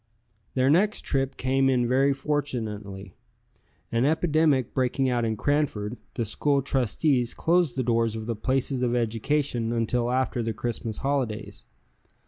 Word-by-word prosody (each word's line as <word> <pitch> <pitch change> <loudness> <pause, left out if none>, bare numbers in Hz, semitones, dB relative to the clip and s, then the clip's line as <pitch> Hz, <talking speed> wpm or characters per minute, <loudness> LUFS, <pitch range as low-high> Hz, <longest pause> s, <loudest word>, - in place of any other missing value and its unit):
Their 130 +1 +3
next 205 +6 +2
trip 135 -1 -1
came 135 +1 +2
in 125 -2 +2
very 135 +3 +3
fortunately. 110 -9 -3 0.8
An 115 +1 +1
epidemic 155 -3 +2
breaking 130 +1 +1
out 120 -1 0
in 110 -1 -1
Cranford, 130 -6 0 0.2
the 115 - -1
school 140 +6 +1
trustees 130 -1 +1
closed 170 -5 +2
the 130 - 0
doors 115 -2 +1
of 110 -1 -5
the 115 0 -2
places 130 +3 -1
of 125 -1 +1
education 120 +1 0
until 120 +1 0
after 125 -1 0
the 115 0 -2
Christmas 115 -1 -4
holidays. 130 -6 -2
125 Hz, 140 wpm, -26 LUFS, 115-140 Hz, 0.8 s, Their